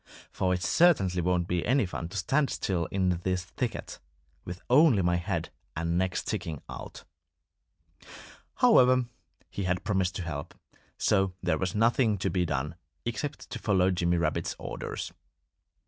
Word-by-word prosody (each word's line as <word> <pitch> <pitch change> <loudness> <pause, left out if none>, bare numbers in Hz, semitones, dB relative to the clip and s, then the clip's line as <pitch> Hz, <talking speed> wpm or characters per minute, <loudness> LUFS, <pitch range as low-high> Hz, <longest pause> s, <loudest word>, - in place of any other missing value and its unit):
For 90 - 0
it 90 0 0
certainly 100 - +4
won't 90 0 +1
be 90 -2 0
any 130 -2 +3
fun 85 -2 -5
to 100 - -6
stand 135 - +1
still 90 -3 -1
in 90 -3 0
this 90 0 -1
thicket, 120 +5 -4 0.5
with 90 +1 -6
only 130 - +5
my 85 0 +2
head 85 -2 -3 0.2
and 85 +1 -1
neck 90 0 0
sticking 80 -4 -3
out." - - -9 1.5
However, 130 0 +5 0.5
he 100 - -3
had 90 +1 0
promised 95 -4 0
to 95 - -3
help. 75 -4 -5 0.4
So 95 -1 +2
there 90 -3 +1
was 95 0 -2
nothing 115 0 +3
to 95 0 -1
be 90 -1 +1
done 75 +1 -2 0.3
except 120 +5 -4
to - - -4
follow 95 -3 +2
Jimmy 85 -1 +1
Rabbit's 85 - -1
orders. - - -5
90 Hz, 150 wpm, -29 LUFS, 85-105 Hz, 1.5 s, only